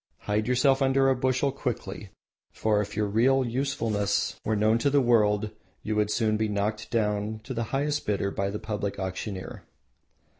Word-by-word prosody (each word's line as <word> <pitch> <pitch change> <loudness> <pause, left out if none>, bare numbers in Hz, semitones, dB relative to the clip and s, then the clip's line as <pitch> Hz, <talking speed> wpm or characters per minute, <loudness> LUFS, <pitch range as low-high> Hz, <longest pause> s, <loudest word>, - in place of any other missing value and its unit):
Hide 105 +1 -1
yourself 135 +2 +3
under 135 0 +3
a - - +2
bushel 130 +2 +1
quickly, 110 -7 -5 0.4
for 105 -1 +1
if 105 0 -6
your 105 - +2
real 125 +6 +3
usefulness 115 -5 -1
were 110 - 0
known 110 +2 +3
to 140 - +2
the 140 +1 +4
world 110 -4 +3 0.3
you 110 - -2
would 105 -1 +1
soon 110 0 +1
be 110 0 0
knocked 105 +2 -2
down 105 -1 -1
to 130 - -5
the 115 -1 -2
highest 145 +5 -1
bidder 100 -1 0
by 100 0 -1
the 105 - -3
public 105 -2 -4
auctioneer. 95 0 -5
110 Hz, 175 wpm, -27 LUFS, 105-130 Hz, 0.4 s, the